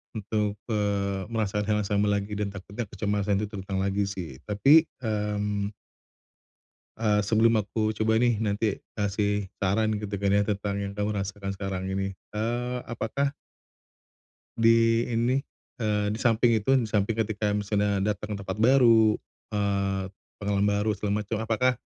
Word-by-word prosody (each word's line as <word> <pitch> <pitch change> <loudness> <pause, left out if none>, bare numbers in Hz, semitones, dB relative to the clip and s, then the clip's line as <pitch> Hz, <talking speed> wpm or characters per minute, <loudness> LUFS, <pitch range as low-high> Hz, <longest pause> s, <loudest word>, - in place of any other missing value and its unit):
untuk, 105 -1 -1 0.2
eee, 100 -2 0
merasakan 105 -2 -1
hal 105 - +2
yang - - -4
sama 105 +1 +1
lagi. 100 0 -1
Dan 105 - 0
takutnya 100 +3 -6
kecemasan 100 0 -1
itu - - -2
terulang 95 -2 -4
lagi 100 +1 +1
sih. 85 -9 -6
Tapi, 140 +11 +5 0.2
mmm 105 -1 -1 1.2
eee, 105 -2 +2
sebelum 110 +1 +4
aku 110 +1 -1
coba 110 0 +2
nih, 120 -2 +2
nanti 105 -1 0 0.2
kasih 105 -1 0
saran, 105 +2 +1
gitu 105 -1 -5
kan 100 0 0
ya, 100 0 +4
tentang 100 -1 -1
yang 100 0 -3
kamu 105 +1 0
rasakan 100 0 -4
sekarang 95 -1 -4
ini, 95 0 -2 0.2
eee, 120 +3 -2
apakah 135 +5 -1 1.2
di 115 0 +4
ini, 120 +2 +1 0.5
eee, 105 -1 +1
di - - -5
samping 115 -1 +3
itu, 110 +5 +1
di 115 -3 -1
samping 105 +1 0
ketika 105 -1 0
misalnya 105 -1 0
datang 105 +2 -7
ke - - -2
tempat 95 0 -4
baru, 115 -2 +5 0.3
eee, 100 -2 0 0.4
pengalaman 100 0 +1
baru, 105 +1 +1
segala 105 0 -1
macam, 105 +2 -3
apakah 115 +3 +1
105 Hz, 150 wpm, -27 LUFS, 100-110 Hz, 1.2 s, Tapi